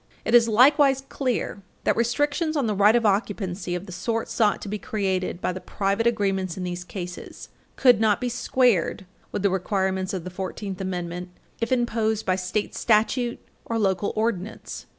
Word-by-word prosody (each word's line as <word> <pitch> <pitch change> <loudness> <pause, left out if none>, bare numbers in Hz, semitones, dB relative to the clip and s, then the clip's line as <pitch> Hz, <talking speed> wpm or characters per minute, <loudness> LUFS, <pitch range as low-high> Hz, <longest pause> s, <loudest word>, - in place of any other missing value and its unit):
It - - -1
is 235 -1 +7
likewise 270 +4 +5
clear 250 -6 -2 0.2
that - - +2
restrictions 290 +7 0
on 275 - +1
the 215 - 0
right 205 +3 +5
of 235 -1 +2
occupancy 195 -3 -1
of 180 +2 -5
the 185 - -10
sort 225 +5 -2
sought 210 -3 +2
to - - -6
be 210 +1 -3
created 190 -3 -2
by 180 - -1
the 185 - -7
private 200 +3 0
agreements 195 -5 0
in 185 - -4
these 180 0 -4
cases 180 -1 -8 0.3
could 245 -5 +5
not 215 -2 +3
be 250 - -2
squared 240 -6 +1 0.3
with 205 - -3
the 200 - +3
requirements 190 0 -1
of 185 -4 -4
the 180 - -7
Fourteenth 190 +1 -5
Amendment 180 -1 -4 0.3
if 230 - -2
imposed 225 -3 0
by 185 - +2
state 185 +3 -2
statute 235 +2 +1 0.3
or 230 - -2
local 195 -2 +1
ordinance. 220 -2 -3
205 Hz, 175 wpm, -25 LUFS, 185-235 Hz, 0.3 s, is